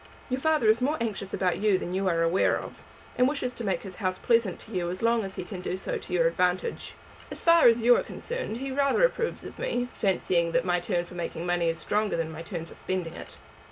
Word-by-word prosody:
Your 255 - 0
father 310 -4 +2
is 220 +3 +4
more 295 +5 +1
anxious 210 -4 -3
about 180 -2 0
you 205 -2 +3
than 180 - -5
you 190 +1 0
are 165 -2 +2
aware 165 +3 +3
of, - - -10 0.4
and 250 - +6
wishes 265 -3 -2
to 235 - -7
make 195 -3 -1
his 190 -2 -9
house 185 -3 -1
pleasant 230 -6 +2
to 225 - -13
you 180 -4 -1
as 185 +4 -5
long 230 -1 +3
as 195 -1 -6
he - - -4
can 185 -1 -7
do 185 - -3
so - - -3
to - - -12
your 175 -2 +3
advantage. 180 - 0 0.3
As - - -7
far 335 -3 +7
as 230 0 +4
you 245 +1 +7
are - - +2
concerned 485 - -5
he 270 +2 -4
rather 275 - +2
approves 475 -1 -2
of - - -10
me, 245 - -1
fancying 175 -4 +1
that 170 +1 +2
my 175 -1 +2
turn 175 0 -1
for 175 - -13
making 170 -1 -4
money 175 -1 +1
is 165 - -2
stronger 210 +2 0
than 165 -1 -2
my 160 +1 -7
turn 165 -1 -5
for - - -13
spending 180 -3 -3
it. 75 - -10
190 Hz, 250 wpm, -27 LUFS, 175-240 Hz, 0.4 s, far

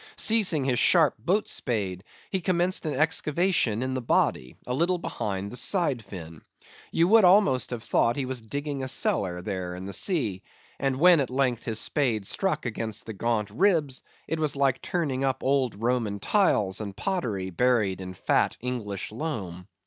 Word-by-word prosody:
Seizing 205 -10 +3
his 130 -2 +1
sharp 160 -6 +4
boat 190 - 0
spade, 100 -7 -2 0.3
he 190 - -1
commenced 180 -1 0
an 150 - -2
excavation 155 - +1
in 130 0 -2
the 130 - -2
body, 65 - 0
a 125 - -3
little 170 +6 +1
behind 100 - -4
the - - -7
side 145 - +1
fin. 85 -5 -10 0.5
You 165 +1 +3
would 225 0 +6
almost 180 -9 +4
have 120 -2 -5
thought 115 +1 +2
he 140 - -2
was 130 -2 -3
digging 140 +4 -4
a 130 - -3
cellar 90 -8 0
there 90 -3 -4
in 90 +1 -7
the 100 - -6
sea; 110 - 0 0.4
and 135 -1 0
when 175 0 +7
at 135 - -1
length 125 -3 0
his 110 -1 -1
spade 115 -5 0
struck 170 - -1
against 110 -2 -3
the 110 - -6
gaunt 105 -1 -1
ribs, 150 - +1 0.3
it 160 - -2
was 155 -3 0
like 135 -2 +1
turning 140 -7 -2
up 130 -1 -1
old 130 -4 +1
Roman 115 -3 -1
tiles 105 - +2
and 100 -2 -7
pottery 110 - -2
buried 105 -2 +1
in 90 0 -7
fat - - +1
English 110 -7 -4
loam. 100 - -5
125 Hz, 175 wpm, -26 LUFS, 105-155 Hz, 0.5 s, when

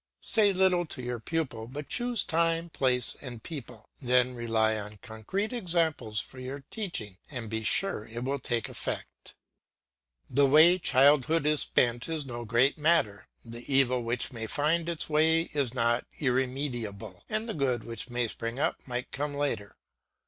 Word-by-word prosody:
Say 210 -3 +4
little 185 -2 +2
to 130 - -7
your 120 -1 -3
pupil, 120 -5 -3
but 140 +3 -7
choose 240 - +1
time, 165 +1 0
place, 125 -4 +2
and 120 -5 -8
people; 125 -8 -8
then 125 0 +3
rely 115 -2 +1
on 105 0 -6
concrete 130 - -3
examples 165 - 0
for 130 - -5
your 135 +2 -6
teaching, 110 - -5
and 120 -6 -6
be 110 0 -2
sure 150 - +1
it 115 +2 -6
will 140 +2 -1
take 120 -2 -1
effect. - - -6 0.9
The 140 +2 +3
way 160 +6 +7
childhood 145 +1 +4
is 150 -1 +3
spent 120 +3 +1
is 160 -3 -2
no 120 -2 -6
great 120 +7 +2
matter; 150 -11 +2 0.2
the 120 +3 -8
evil 130 -2 +4
which 120 +3 -1
may 115 -1 -5
find 160 +6 +1
its 170 -2 -1
way 160 +2 +2
is 140 -5 +1
not 120 -1 +1
irremediable, 125 - -2
and 215 +2 -2
the 220 - -3
good 130 -5 0
which 115 +1 -6
may 120 -1 0
spring 115 +2 -5
up 140 - 0
might 125 0 -4
come 145 +1 -3
later. 140 -8 -2
130 Hz, 165 wpm, -29 LUFS, 115-160 Hz, 0.9 s, way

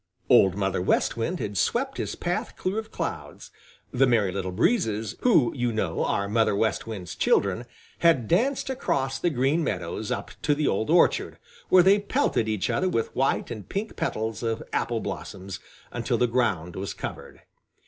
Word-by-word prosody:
Old 95 -2 +6
Mother 95 -2 -1
West 90 - +1
Wind 160 +10 -2
had 105 - -4
swept 270 +3 0
his - - -3
path 175 0 -3
clear 190 +4 -1
of 220 - -8
clouds. - - -6 0.4
The 135 +2 +3
Merry 110 -6 +2
Little 95 -1 -3
Breezes, 110 - 0
who, 170 - +4
you 120 -2 0
know, 95 -7 -1
are 100 - 0
Mother 110 0 +2
West 110 +2 0
Wind's 95 -7 -6
children, 100 +5 +1 0.3
had 160 -10 +3
danced 265 +8 +1
across 135 - -1
the 175 - +1
Green 145 +3 +1
Meadows 90 - -3
up - - -3
to 150 -1 +2
the 150 0 0
old 110 +3 0
orchard, - - +3 0.3
where 185 -1 +7
they 195 +3 +5
pelted 200 - 0
each 110 -3 -1
other 185 - +1
with 115 -9 -2
white 135 -1 0
and 110 -5 -7
pink 210 +3 -3
petals 110 0 -2
of 115 -2 -2
apple - - 0
blossoms 95 -1 -6 0.3
until - - -1
the 125 - +3
ground 105 -9 0
was 95 +1 -4
covered. - - -7
115 Hz, 175 wpm, -26 LUFS, 100-170 Hz, 0.4 s, where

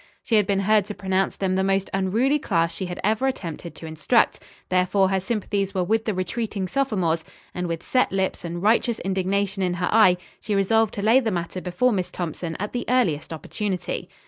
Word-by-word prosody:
She - - -4
had 210 -3 +4
been 195 -1 +1
heard 210 0 +3
to 210 - -6
pronounce 190 0 0
them 190 -1 -1
the 190 0 +1
most 195 0 +1
unruly 220 +10 +2
class 165 - 0
she 185 +2 -4
had 175 - -6
ever 220 +6 +2
attempted 170 - -5
to - - -10
instruct. 160 +9 +2 0.3
Therefore 185 +1 +3
her 190 0 +1
sympathies 195 -1 -2
were 185 - +2
with 220 +5 0
the 215 - -1
retreating 195 +1 -2
sophomores, 185 -11 0 0.3
and 180 0 -3
with 165 -1 -4
set 255 - +2
lips 190 -1 -1
and 170 +1 -5
righteous 230 +2 +3
indignation 195 +1 -1
in 180 -1 0
her 180 0 -1
eye, 210 -5 +6 0.2
she 210 - -2
resolved 220 +2 +2
to 200 - -3
lay 225 +5 +6
the 235 -4 -1
matter 180 -1 -3
before 185 +9 +1
Miss 185 -5 -1
Thompson, 165 -1 -4
at 205 +2 -4
the 245 - -2
earliest 185 -15 +1
opportunity. 185 +4 -4
195 Hz, 200 wpm, -24 LUFS, 180-215 Hz, 0.3 s, eye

